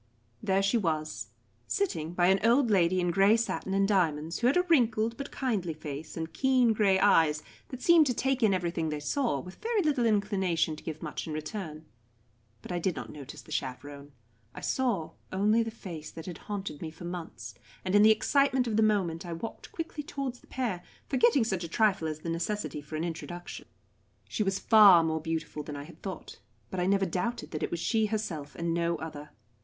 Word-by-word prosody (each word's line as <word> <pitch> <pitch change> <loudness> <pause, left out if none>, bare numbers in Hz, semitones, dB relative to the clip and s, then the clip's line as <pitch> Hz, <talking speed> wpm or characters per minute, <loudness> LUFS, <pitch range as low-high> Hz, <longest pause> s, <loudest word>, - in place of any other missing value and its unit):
There 195 0 +1
she 200 +5 +3
was, 155 -5 -2 0.4
sitting 170 - -1
by 175 - +3
an 195 +1 +4
old 235 +1 +4
lady 185 -2 +3
in 175 -1 +1
grey 195 +5 +5
satin 195 -4 -2
and 195 0 +3
diamonds, 165 -5 +1
who 240 - +3
had 275 - +3
a 360 - +4
wrinkled 230 -9 +2
but 275 +2 -6
kindly 200 - -2
face 150 +1 -7
and 160 0 -4
keen 255 -3 +3
grey 200 -3 +3
eyes 160 -6 +4 0.2
that 255 -1 -8
seemed 335 -3 +6
to 250 - +1
take 265 +1 0
in 220 -3 +5
everything 170 -3 -1
they 150 -1 -3
saw, 190 - 0
with 180 +7 -11
very 445 -3 +1
little 280 -6 +2
inclination 190 -6 +1
to - - -13
give 155 -1 -6
much - - -5
in 155 - -4
return. 155 -1 -5 0.8
But - - -8
I 175 - -1
did 180 0 0
not - - -6
notice 145 -1 -10
the - - -15
chaperon. 140 +2 -5 0.4
I - - -7
saw 235 -11 0 0.2
only 210 +4 +3
the 225 - -2
face 170 -8 -8
that 160 - -9
had 175 -3 -7
haunted 195 -7 -4
me 160 - -4
for 165 +2 -11
months, 175 -1 -6 0.3
and 185 - -1
in 205 - +7
the 215 - +8
excitement 265 +3 +3
of 220 -3 -1
the - - +4
moment 190 -7 +1
I 175 -2 -5
walked 195 +8 -7
quickly 325 -2 -5
towards 275 -5 -5
the - - -22
pair, 230 -9 -2 0.3
forgetting 250 0 +4
such 190 -5 -2
a - - -3
trifle 195 -4 +2
as 155 0 -5
the 165 - -4
necessity 170 -1 -3
for 150 +2 -8
an 155 - -2
introduction. 175 +1 -6 0.6
She - - -3
was 195 -2 +1
far 200 -5 +7
more 160 -1 -1
beautiful 160 -1 -3
than 145 0 -7
I 140 - -6
had 165 +2 -14
thought, 190 -2 -7 0.3
but 190 - -3
I 180 - +1
never 195 0 +3
doubted 220 +7 -3
that 155 - -4
it - - -1
was 170 - -3
she 220 +4 +1
herself 170 -10 -4
and 170 0 -1
no 170 0 +1
other. 150 -2 -7
190 Hz, 210 wpm, -29 LUFS, 160-225 Hz, 0.8 s, the